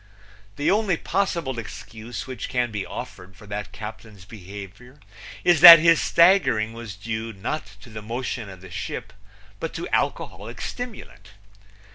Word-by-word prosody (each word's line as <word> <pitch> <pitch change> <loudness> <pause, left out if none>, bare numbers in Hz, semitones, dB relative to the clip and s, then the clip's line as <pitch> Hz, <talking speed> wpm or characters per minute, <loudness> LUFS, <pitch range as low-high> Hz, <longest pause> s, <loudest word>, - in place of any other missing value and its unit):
The 145 - +1
only 205 -4 +1
possible 170 -10 -2
excuse 110 +1 -8
which 130 -5 -6
can 120 -2 -1
be 105 -2 -4
offered 95 +1 -9
for 105 - -15
that 100 0 -6
captain's 105 -3 -10
behavior 100 +6 -11 0.4
is 175 -3 +4
that 170 -1 +14
his 165 +1 +4
staggering 170 - +3
was 115 -4 -8
due 110 +2 -5
not 100 0 -5
to 115 - -14
the 110 0 -7
motion 115 0 -4
of 95 -2 -12
the 95 -2 -12
ship - - -6 0.5
but - - -5
to - - -4
alcoholic 105 +7 -2
stimulant. 245 - -8
115 Hz, 145 wpm, -24 LUFS, 100-150 Hz, 0.5 s, that